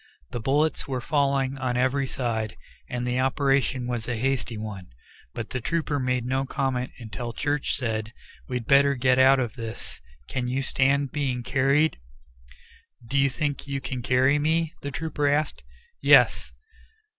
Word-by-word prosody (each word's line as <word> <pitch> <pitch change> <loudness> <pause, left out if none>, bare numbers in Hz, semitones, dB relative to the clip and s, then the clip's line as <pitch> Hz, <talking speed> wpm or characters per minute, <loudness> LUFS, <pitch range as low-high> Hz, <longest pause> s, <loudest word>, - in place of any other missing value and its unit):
The - - -3
bullets 145 +5 +1
were 130 -2 -2
falling 140 0 0
on 125 -1 -1
every 130 +2 +1
side, 115 -5 -3 0.3
and 125 0 -3
the 125 +1 0
operation 135 -1 +1
was 120 -2 -3
a 120 -2 -2
hasty 125 -2 -1
one, 105 -4 -6 0.5
but 115 - -5
the 125 - -3
trooper 155 +1 -1
made 125 -2 0
no 130 +2 0
comment 130 -2 -1
until 120 0 -6
Church 145 +2 -1
said, 110 -3 -2 0.4
"We'd 125 -2 -3
better 140 +2 +5
get 130 0 +3
out 135 +1 +6
of 120 -4 -2
this; 115 -2 -7 0.3
can 125 - -2
you 130 +2 -1
stand 140 +1 +1
being 135 -5 -1
carried?" 140 +5 +2 1.1
"Do 125 +5 -5
you 140 0 +4
think 145 +1 -3
you 140 -1 -2
can 130 -2 -5
carry 130 +3 +3
me?" 160 +1 +1
the 140 - -4
trooper 150 0 -2
asked. 145 +1 0 0.4
"Yes." - - +5
130 Hz, 155 wpm, -26 LUFS, 125-140 Hz, 1.1 s, out